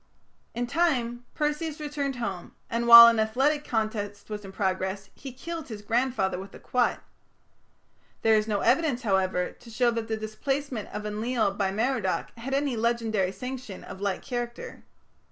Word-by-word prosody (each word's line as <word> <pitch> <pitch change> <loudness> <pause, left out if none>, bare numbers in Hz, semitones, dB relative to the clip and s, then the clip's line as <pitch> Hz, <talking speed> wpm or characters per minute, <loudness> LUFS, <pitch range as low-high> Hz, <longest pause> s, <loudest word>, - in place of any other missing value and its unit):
In 240 +1 -1
time, 245 -5 0
Perseus 300 +1 -2
returned 290 -2 -3
home, 195 -8 -5 0.2
and 235 +1 -1
while 235 0 +13
an 230 -1 +5
athletic 270 +7 +1
contest 215 -4 -3
was 210 0 -5
in 195 - -9
progress, 190 0 -2
he 270 - -9
killed 325 +5 -6
his 215 -4 -8
grandfather 230 -5 0
with 195 +1 -10
a - - -11
quoit. 250 -1 +1 1.3
There 225 - +5
is 215 0 +3
no 205 -2 0
evidence, 260 0 +2
however, 190 -3 +1
to 235 - -16
show 240 +1 +2
that 230 -1 -3
the 220 -1 -2
displacement 240 +2 -3
of 210 - -5
Enlil 215 0 0
by 195 -1 0
Merodach 220 -2 -1
had 270 +4 -2
any 280 -2 0
legendary 225 -4 0
sanction 250 -3 -7
of 190 - -10
like 200 -2 -2
character. 240 -2 -5
235 Hz, 160 wpm, -27 LUFS, 205-260 Hz, 1.3 s, while